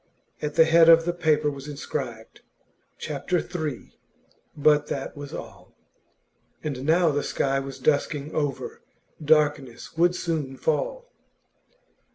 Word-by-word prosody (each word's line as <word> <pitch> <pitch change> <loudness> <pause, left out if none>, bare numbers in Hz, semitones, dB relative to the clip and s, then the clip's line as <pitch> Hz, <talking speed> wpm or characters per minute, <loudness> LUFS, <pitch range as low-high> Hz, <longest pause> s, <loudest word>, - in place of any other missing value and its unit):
At 150 - -3
the 160 - +7
head 165 +1 +6
of 165 0 +7
the 175 - 0
paper 155 -3 +1
was 140 0 -9
inscribed 130 -6 -6 0.6
'Chapter 150 +4 -2
III.,' 160 -7 -4 0.6
but 150 0 +4
that - - -4
was 145 -1 -8
all. - - -10 0.9
And 140 -3 -4
now 165 0 +4
the 145 0 0
sky 135 -1 0
was 135 0 -7
dusking 145 +2 0
over; 145 -3 -3 0.4
darkness 145 -5 +1
would 175 +1 +3
soon 150 -7 -3
fall. - - -2
150 Hz, 125 wpm, -25 LUFS, 140-160 Hz, 0.9 s, the